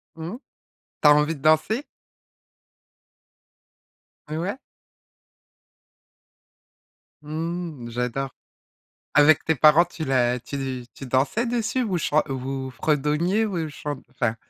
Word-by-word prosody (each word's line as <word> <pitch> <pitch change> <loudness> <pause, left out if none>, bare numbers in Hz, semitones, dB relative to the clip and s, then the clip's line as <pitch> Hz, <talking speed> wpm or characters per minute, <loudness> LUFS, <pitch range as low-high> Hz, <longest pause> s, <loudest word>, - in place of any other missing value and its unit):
Mmh. 165 +8 -6 0.6
Tu 150 - +6
as 150 - +9
envie 150 +2 +2
de 140 - -14
danser? 155 - +2 2.4
Heu, 155 +1 -4
ouais. 200 +9 -3 2.6
Mmh, 160 -4 -4
j'adore. 125 +3 -3 0.8
Avec 150 +1 +6
tes 160 - +2
parents, 155 +5 +6
tu 170 -2 -7
la 125 -2 +2
tu 130 -1 -5
tu 135 - -9
dansais 135 - +1
dessus, 240 +2 0
vous 195 -6 -1
chan 155 -2 +2
vous 135 -1 -4
fredonniez 155 +10 +1
ou 170 -6 -2
chant 145 -1 -6
enfin, 120 -3 -1
150 Hz, 110 wpm, -24 LUFS, 135-170 Hz, 2.6 s, as